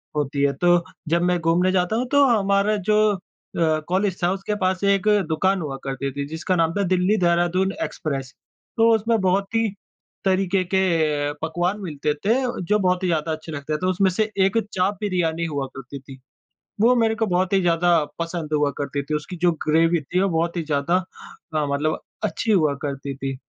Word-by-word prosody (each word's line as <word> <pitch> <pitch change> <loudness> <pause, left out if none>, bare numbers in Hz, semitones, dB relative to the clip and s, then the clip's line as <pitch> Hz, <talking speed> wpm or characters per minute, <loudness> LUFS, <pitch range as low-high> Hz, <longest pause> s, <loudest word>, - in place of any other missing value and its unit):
होती 145 -1 -1
है। 140 0 +3
तो 175 -1 +3 0.3
जब 170 +1 +2
मैं 180 0 +1
घूमने 170 +3 +2
जाता 180 +3 +1
हूँ, 245 +3 0
तो 285 0 +5
हमारा 205 -3 +2 0.2
जो 210 - +4 0.6
अ, 160 -2 +2
कॉलेज 190 +1 0
था, 175 - +3
उसके 195 +2 -3
पास 185 +1 0
एक 200 0 +2 0.2
दुकान 185 +4 +1
हुआ 145 -4 -4
करती 135 0 -3
थी, 140 +1 -4
जिसका 160 +4 -2
नाम 165 -1 +2
था, 200 +1 0
दिल्ली-देहरादून 180 0 +2
एक्सप्रेस। 135 -4 -4 0.4
तो 225 0 +5
उसमें 225 +1 +1
बहुत 195 +3 0
ही 225 0 +2 0.6
तरीके 190 0 +2
के 190 - +4 0.6
पकवान 175 +5 -1
मिलते 150 -5 -2
थे, 195 +10 0 0.3
जो 210 +4 +1
बहुत 185 -1 +1
ही - - +1
ज़्यादा 160 -2 0
अच्छे 160 +1 -6
लगते 145 +1 -4
थे। - - 0
तो 185 - +1
उसमें 190 +1 +2
से 215 +4 0 0.2
एक 195 +3 +1 0.2
चाप 190 +2 0
बिरयानी 170 -4 0
हुआ 145 -4 -2
करती 135 +1 -8
थी। 135 0 -13 0.6
वो 240 +3 +5
मेरे 225 -2 +2
को 225 0 0
बहुत 185 +1 0
ही 195 - +4
ज़्यादा 175 0 +2 0.3
पसंद 165 -2 -4
हुआ 145 -1 +2
करती 140 0 -3
थी। 150 - -5
उसकी 150 +5 -5
जो 175 - +5 0.2
ग्रेवी 165 +2 +3
थी, 175 +6 -2
वो 195 - +2
बहुत 170 +2 -1
ही 170 - -1
ज़्यादा 150 +3 +1 0.6
अ, 155 -1 +1
मतलब 145 +2 -1 0.2
अच्छी 225 - -1
हुआ 155 -8 +3
करती 140 -1 -4
थी। 135 0 -4
175 Hz, 190 wpm, -22 LUFS, 155-195 Hz, 0.6 s, तो